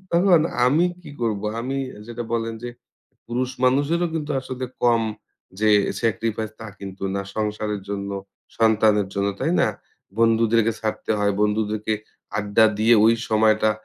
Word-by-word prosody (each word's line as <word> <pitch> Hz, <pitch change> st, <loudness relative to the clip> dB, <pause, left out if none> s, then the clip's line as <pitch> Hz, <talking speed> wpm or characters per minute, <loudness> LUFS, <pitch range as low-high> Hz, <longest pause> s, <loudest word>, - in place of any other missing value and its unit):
তখন 175 Hz, -1 st, +5 dB, 0.3 s
আমি 150 Hz, +7 st, +4 dB, 0.2 s
কি -, -, -10 dB
করব? 110 Hz, -4 st, 0 dB, 0.2 s
আমি 130 Hz, +3 st, -3 dB, 0.3 s
যেটা 120 Hz, 0 st, -5 dB
বললেন 115 Hz, -1 st, -1 dB
যে, -, -, -3 dB, 0.6 s
পুরুষ 125 Hz, +2 st, -2 dB
মানুষেরও 145 Hz, +7 st, +2 dB
কিন্তু 150 Hz, -2 st, -3 dB
আসলে 130 Hz, 0 st, -5 dB, 0.2 s
কম 120 Hz, -1 st, +4 dB, 0.6 s
যে 110 Hz, -, +3 dB, 0.3 s
sacrifice 110 Hz, -1 st, -1 dB
তা 110 Hz, -, -6 dB
কিন্তু 95 Hz, -1 st, -8 dB
না 100 Hz, -, -1 dB
সংসারের 105 Hz, -1 st, -2 dB
জন্য, 100 Hz, 0 st, -4 dB, 0.5 s
সন্তানের 110 Hz, -3 st, +3 dB
জন্য, 100 Hz, 0 st, 0 dB
তাই -, -, +1 dB
না? -, -, +3 dB, 0.5 s
বন্ধুদেরকে 115 Hz, 0 st, +3 dB
ছাড়তে 110 Hz, -1 st, -3 dB
হয়, 100 Hz, 0 st, +2 dB
বন্ধুদেরকে 105 Hz, 0 st, 0 dB, 0.4 s
আড্ডা 105 Hz, +1 st, +3 dB
দিয়ে 115 Hz, +2 st, +5 dB
ওই 115 Hz, +1 st, +6 dB
সময়টা 110 Hz, 0 st, +3 dB
110 Hz, 140 wpm, -23 LUFS, 105-120 Hz, 0.6 s, ওই